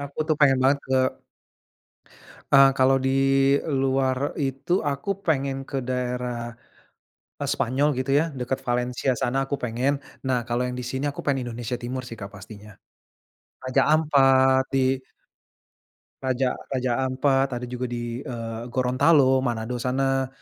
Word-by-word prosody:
aku 140 0 -9
tuh 155 - +2
pengen 135 -3 +5
banget 135 +2 +3
ke 130 - 0 1.6
eee, 135 0 +8
kalau 130 +1 +4
di 130 0 0 0.5
luar 135 -1 0
itu 135 +3 -3
aku 140 +3 -3 0.2
pengen 135 -3 -1
ke 135 0 -3
daerah, 125 -1 -3 0.9
eee, - - -2
Spanyol 135 +5 +1
gitu 130 +1 -2
ya - - +1
dekat 130 +1 -3
Valencia 125 +2 0
sana 120 +4 -1
aku 140 - -1
pengen, 125 +4 0 0.3
nah 125 -2 0
kalau 120 +1 0
yang 125 0 -4
di 125 - -5
sini 130 +3 -3
aku 145 - -5
pengen 135 -3 -1
Indonesia 120 +1 -4
Timur 125 +2 -4
sih 115 -1 -8
Kak 100 - -6
pastinya, 105 +1 -12 0.9
Raja 130 +1 +1
Ampat 135 -4 +4
di 135 0 +2 1.3
Raja 130 -1 0 0.2
Raja 130 -2 -1
Ampat 135 +1 +1
ada 125 - -6
juga 125 +1 -4
di, 120 +1 -4
eee, 115 -4 -6
Gorontalo, 130 +1 +3
Manado 120 -1 -2
sana 135 +1 0
130 Hz, 140 wpm, -24 LUFS, 125-135 Hz, 1.6 s, eee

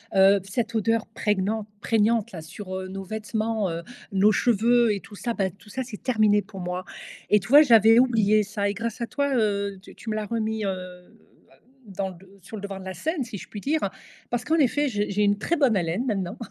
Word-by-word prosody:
Heu, 195 +1 +6
cette 225 +4 -3
odeur 225 +1 +1
préguenante 210 0 -1
prégnante 225 0 +2
là, 165 - -7
sur, 185 +4 -9
heu, 185 - -6
nos 195 +1 -6
vêtements, 220 0 -2
heu, 165 0 -4 0.3
nos 200 +2 +5
cheveux 235 +1 +3
et 200 - -3
tout 205 - -13
ça 235 +3 -3
bah, 195 -3 0
tout 195 +4 -20
ça 260 +5 -4
c'est 235 -4 -9
terminé 215 -4 +3
pour 195 - -11
moi 180 +1 -4 0.5
et 210 - +6
tu 195 - -9
vois? 290 +3 +9
J'avais 225 -4 +6
oublié 215 -4 +3
ça 205 0 -2
et 200 - -1
grâce 230 +2 -4
à 235 - -1
toi, 280 -2 -1
heu, 200 -3 0
tu - - -14
tu 225 - -8
me 215 - -1
l'as 215 - -2
remis, 220 -1 -2
heu, - - 0 0.8
à - - -22 0.3
dans 195 -1 -4
d 185 +1 -15 0.2
sur 180 +5 -10
le 210 - -7
devant 200 -1 -6
de 190 - -10
la 190 - -5
scène 300 - -2
si 215 -3 -7
je - - -11
puis 205 - -7
dire. 310 +6 0 0.5
Parce 240 0 -2
qu'en 315 - +2
effet, 290 -1 +2
j'ai 205 -4 -1
j'ai 205 +1 0
une 205 0 +3
très 335 +10 -1
bonne 265 -7 +3
haleine 180 +6 -1
maintenant. 200 -4 -2
210 Hz, 230 wpm, -25 LUFS, 195-230 Hz, 0.8 s, vois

